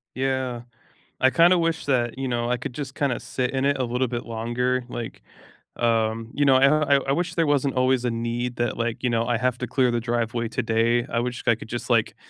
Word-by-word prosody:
Yeah, 130 -2 -1 0.6
I 130 - +5
kinda 170 +5 +5
wish 165 -1 -1
that, 120 -3 0
you 135 0 -2
know, 120 -1 -1
I 125 - +1
could 130 +1 -6
just 135 0 -6
kinda 135 -4 0
sit 125 -1 -3
in 135 0 -1
it 140 0 +2
a 130 - 0
little 125 +1 0
bit 120 0 -4
longer, 120 +3 -1
like, 120 -1 -6 0.6
um, 115 -1 0
you 145 - +1
know, 135 -1 +5
I 140 +2 +4
I - - +1
I - - +3
wish 175 +4 -1
there 165 - +2
wasn't 140 -2 +1
always 130 -1 +2
a 120 - +1
need 120 +1 -3
that, 120 - -1
like, 115 +1 -3
you 125 - +2
know, 115 -1 +1
I 120 -1 +1
have 125 +1 0
to 125 - -3
clear 125 +1 +2
the 120 - 0
driveway 115 0 -1
today. 115 +1 +1
I 115 - -1
wish 120 0 -3
I 120 - +5
could 110 - -11
just 120 +2 -5
like, 115 -3 +2
125 Hz, 235 wpm, -24 LUFS, 120-135 Hz, 0.6 s, I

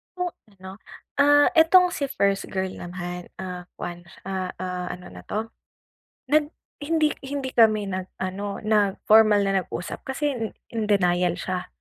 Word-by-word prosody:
Hmm, 360 -1 -2 0.3
'no, 190 0 -8 0.5
ah, 290 0 +6
itong 360 +3 +6
si 280 -4 -2
first 200 -5 0
girl 190 0 -2
naman, 175 0 -6
ah, 180 -1 -6
kuwan 175 0 -7 0.2
ah 185 -1 -3
ah, 180 -1 -3
ano 180 0 -11
na - - -10
to? 220 +2 -3 0.8
Nag 300 +1 +3 0.2
hind-i 305 0 +1
hindi 275 -1 -3
kami 215 -4 +4
nag-ano, 190 +1 -4
nag-formal 210 0 +4
na 195 -1 +1
nag-usap 175 - -6
kasi 290 +2 -1
in 230 -3 -3 0.3
in 225 -2 -1
denial 180 -3 +2
siya. 185 0 -4
200 Hz, 140 wpm, -25 LUFS, 185-265 Hz, 0.8 s, ah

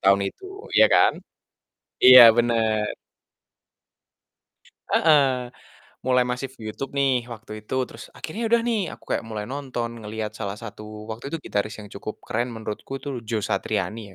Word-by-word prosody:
Tahun 100 +1 +5
itu, - - -14 0.3
iya - - +8
kan? - - +5 0.9
Iya, 130 0 +11 0.2
bener. 110 -3 +1 2.0
Heeh, 135 -6 +3 0.5
mulai 125 -1 +4
masif 125 +2 -4
YouTube 110 +6 -6
nih 130 -3 +1
waktu 110 -1 -13
itu, - - -4
terus - - -11
akhirnya 225 +8 -4
udah 235 +1 +3
nih, 235 -3 0
aku - - -15
kayak - - -1
mulai 105 -2 -4
nonton, 130 -4 -4
ngelihat 110 0 -5
salah 100 -2 -3
satu 105 -1 -9 0.3
waktu 110 +3 -8
itu 165 - -2
gitaris 105 +1 -2
yang 105 - -11
cukup 105 +2 -6
keren 120 +1 -1
menurutku 110 +3 -7
itu 135 -4 -4
Joe 110 -3 -1
Satriani 105 -3 -2
120 Hz, 145 wpm, -24 LUFS, 110-135 Hz, 2.0 s, Iya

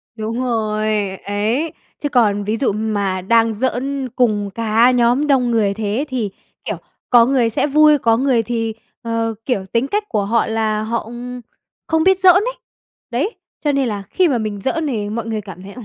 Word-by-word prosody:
Đúng 225 +3 -3
rồi, 215 -3 -1 0.4
ấy. 220 +10 -1 0.3
Chứ 290 - -2
còn 205 -5 +2
ví 215 +2 -1
dụ 250 - +1
mà 200 -3 -1
đang 225 +3 +3
giỡn 260 +3 -2
cùng 210 -5 +1
cả 230 +2 +3
nhóm 245 +4 +2
đông 255 -4 +2
người 210 -4 +2
thế 220 +6 -2
thì, 235 -6 -2 0.4
kiểu, - - -3 0.3
có 240 -2 +7
người 250 -3 +2
sẽ 255 - 0
vui, 300 +1 +5
có 230 -3 +2
người 255 -3 +2
thì, 225 0 -2 0.3
ờ, 230 -1 -1
kiểu, 205 -8 -1
tính 235 +4 +1
cách 415 +5 -1
của 210 -3 0
họ 230 +3 +2
là 220 -1 -1
họ, 235 +1 -1
ừm, 245 +2 -7 0.5
không 320 0 +2
biết 380 +1 +4
giỡn 365 -1 +7
ấy. 460 +6 +1 0.6
Đấy, 295 - 0 0.3
cho 295 - +2
nên 275 -3 +1
là 205 -2 -3
khi 370 -2 +2
mà 265 -6 +1
mình 215 -2 -3
giỡn 315 - -1
thì 210 -6 -2
mọi 225 +1 -3
người 220 -2 -3
cảm 190 -2 -11
thấy, 200 +1 -10
ừm, 245 - -9
230 Hz, 195 wpm, -19 LUFS, 215-265 Hz, 0.6 s, có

